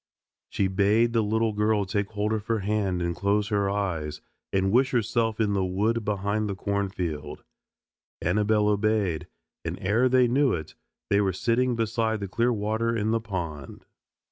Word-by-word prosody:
She 95 - 0
bade 105 +5 +2
the 115 - +3
little 110 +1 +1
girl 105 -1 +1
take 100 +1 -1
hold 105 +1 0
of 110 -1 -3
her 115 -2 0
hand 100 -3 0
and 85 0 -1
close 100 +2 +1
her 100 -2 +1
eyes, 85 -7 -2 0.3
and 95 0 +1
wish 130 +4 +4
herself 115 -2 0
in 105 -2 +2
the 95 -1 +1
wood 105 +5 0
behind 105 +1 -1
the 100 - -2
cornfield. 95 -6 -3 0.8
Annabelle 105 +3 +2
obeyed, 105 -5 0 0.4
and - - -4
ere 110 +7 +2
they 125 -1 +4
knew 130 +1 +2
it 80 -2 -5 0.4
they 100 +1 +4
were 95 -2 +1
sitting 120 +5 +1
beside 115 -1 0
the 100 - -4
clear 115 +6 +1
water 110 +1 -1
in 110 +1 0
the 115 0 +1
pond. 85 -9 -6
105 Hz, 170 wpm, -26 LUFS, 95-115 Hz, 0.8 s, wish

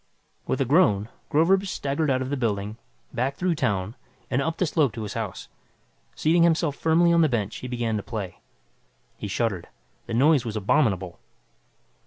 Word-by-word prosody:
With - - 0
a 135 - +2
groan, 115 - +3 0.2
Groverzb 190 +6 +3
staggered 145 -2 -1
out 130 -1 +1
of 130 - -5
the - - +1
building, 105 -4 -2 0.4
back 130 +3 -1
through 180 +2 0
town, 100 - -1 0.4
and 130 - +2
up 165 +3 -2
the 185 - +2
slope 145 - +1
to 110 - -5
his 105 - -5
house. - - -5 0.7
Seating 165 +2 +3
himself 165 -3 +3
firmly 170 +2 +3
on 170 - +5
the 160 - +4
bench 110 -6 -2
he 125 - -7
began 120 -3 -1
to - - -2
play. 100 -5 -6 0.8
He - - -4
shuddered. 100 -3 -1 0.4
The 115 - -3
noise 140 +1 +4
was 115 -3 -5
abominable. 95 - +1
130 Hz, 175 wpm, -25 LUFS, 105-160 Hz, 0.8 s, on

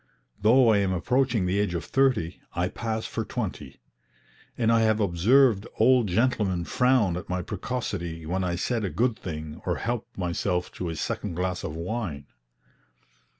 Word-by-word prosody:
Though 115 +4 +5
I 105 -2 +5
am 100 -1 +1
approaching 120 +2 +1
the 95 +3 +1
age 100 -4 0
of 85 - -3
thirty, 125 -11 +1
I 90 +1 0
pass 110 -1 -3
for - - -3
twenty; - - -5 0.8
and 115 -2 +2
I 115 - +4
have 110 -1 +3
observed 105 +4 +3
old 125 -3 +4
gentlemen 100 -3 +1
frown 125 -3 +2
at 90 - -8
my 90 0 -1
precocity 90 -6 -4
when 95 +4 -1
I 90 -1 -1
said 115 +5 -1
a 100 - -1
good 120 +5 +1
thing 80 -5 -7
or - - 0
helped 120 0 -4
myself 90 0 -1
to 90 - -4
a 80 - -4
second 80 - -3
glass 90 +1 -2
of 75 - -4
wine. 85 -5 -4
100 Hz, 165 wpm, -26 LUFS, 90-120 Hz, 0.8 s, Though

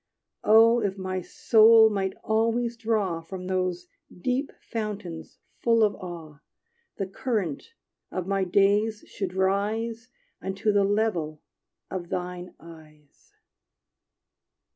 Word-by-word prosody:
Oh 225 +2 +6
if 200 -2 -2
my 185 -1 -3
soul 220 +3 +6
might 195 -2 -1
always 230 +2 +1
draw 215 -7 -1
From 185 +2 -8
those 185 -1 -1 0.2
deep 255 +9 -2
fountains 205 -7 -6 0.2
full 230 -1 +3
of 210 -1 +3
awe, 165 -6 -9 0.6
The 195 - -2
current 205 - -3 0.3
of 185 - -4
my 195 0 0
days 205 +3 +2
should 190 -2 -5
rise 220 +5 -1 0.3
Unto 195 +3 -1
the 205 -1 +3
level 195 -8 -1 0.5
of 175 -2 -5
thine 180 0 -5
eyes! 155 -3 -17
195 Hz, 110 wpm, -26 LUFS, 180-220 Hz, 0.6 s, Oh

